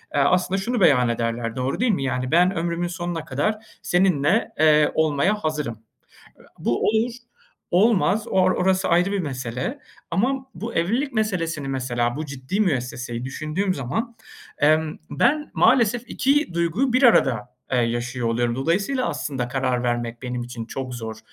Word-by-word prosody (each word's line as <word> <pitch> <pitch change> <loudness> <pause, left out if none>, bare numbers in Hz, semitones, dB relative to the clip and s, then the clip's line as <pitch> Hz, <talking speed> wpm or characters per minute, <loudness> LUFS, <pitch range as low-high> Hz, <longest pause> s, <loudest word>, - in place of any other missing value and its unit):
eee, - - +3
aslında 180 +6 +2
şunu 235 +2 -1
beyan 125 -8 +5
ederler, 115 0 -2
doğru 130 +1 -2
değil 250 0 +3
mi? 160 -9 -1
Yani, 130 -1 -2
"Ben 180 +4 +4
ömrümün 170 +1 -1
sonuna 175 -2 -4
kadar 145 +11 0 0.3
seninle, 180 +1 +2
eee, 155 -1 +5
olmaya 160 +5 +2
hazırım." 150 - -3 0.8
Bu 120 - 0
olur, 225 +3 +1 0.6
olmaz. 210 +2 +3
Or 185 -1 +3
orası 190 +1 +1
ayrı 180 +3 +3
bir 200 - 0
mesele. 130 - -4 0.3
Ama 260 +9 0
bu 230 +2 -6
evlilik 235 - 0
meselesini 170 -10 -1
mesela, 120 -2 -1
bu 155 +1 -4
ciddi 140 +8 -4
müesseseyi 125 - -2
düşündüğüm 155 +8 -2
zaman, 205 - -3 0.4
emm, 155 +1 +2
ben 300 +5 +1
maalesef 235 -1 +3
2 280 - +1
duyguyu 170 +10 +1
bir 255 +3 +2
arada, 125 - +4 0.2
eee, 125 - +3
yaşıyor 120 +1 -1
oluyorum. 120 +1 0
Dolayısıyla 200 - 0
aslında 130 -4 -3
karar 130 -1 -1
vermek 120 -1 -2
benim 125 -1 -3
için 120 -2 -7
çok 130 +1 -5
zor. 110 -2 -6
155 Hz, 150 wpm, -23 LUFS, 125-200 Hz, 0.8 s, beyan